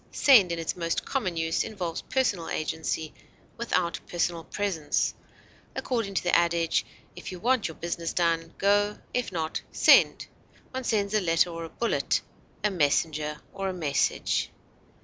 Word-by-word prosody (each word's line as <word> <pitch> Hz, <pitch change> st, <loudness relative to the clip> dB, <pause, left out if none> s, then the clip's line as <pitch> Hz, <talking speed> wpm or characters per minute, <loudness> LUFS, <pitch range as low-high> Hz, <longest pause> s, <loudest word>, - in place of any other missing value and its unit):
Send 220 Hz, -11 st, +6 dB
in 170 Hz, -, -1 dB
its 165 Hz, -1 st, -2 dB
most 165 Hz, -1 st, -2 dB
common 185 Hz, -11 st, -2 dB
use 165 Hz, 0 st, +1 dB
involves 180 Hz, -6 st, -4 dB
personal 205 Hz, -11 st, 0 dB
agency 160 Hz, 0 st, -2 dB, 0.4 s
without 180 Hz, -7 st, -1 dB
personal 170 Hz, -1 st, -1 dB
presence; 180 Hz, -8 st, -1 dB, 0.6 s
according 225 Hz, -6 st, -2 dB
to -, -, +1 dB
the 175 Hz, -, +3 dB
adage, 170 Hz, -1 st, +2 dB, 0.3 s
"If -, -, -7 dB
you 180 Hz, -, -7 dB
want 245 Hz, +2 st, +2 dB
your 160 Hz, -, -8 dB
business 170 Hz, 0 st, -3 dB
done, 165 Hz, -1 st, 0 dB
go; 205 Hz, +1 st, +2 dB, 0.2 s
if 250 Hz, -4 st, -1 dB
not, 160 Hz, -3 st, -2 dB
send;" -, -, +5 dB, 0.5 s
one 260 Hz, -1 st, -4 dB
sends 205 Hz, -3 st, 0 dB
a 215 Hz, -, +3 dB
letter 165 Hz, -1 st, +2 dB
or 165 Hz, 0 st, -5 dB
a -, -, -9 dB
bullet, 235 Hz, +6 st, 0 dB, 0.4 s
a 210 Hz, -, +2 dB
messenger 150 Hz, -2 st, 0 dB
or 195 Hz, 0 st, -2 dB
a -, -, -3 dB
message. 150 Hz, -6 st, 0 dB
175 Hz, 150 wpm, -27 LUFS, 165-205 Hz, 0.6 s, Send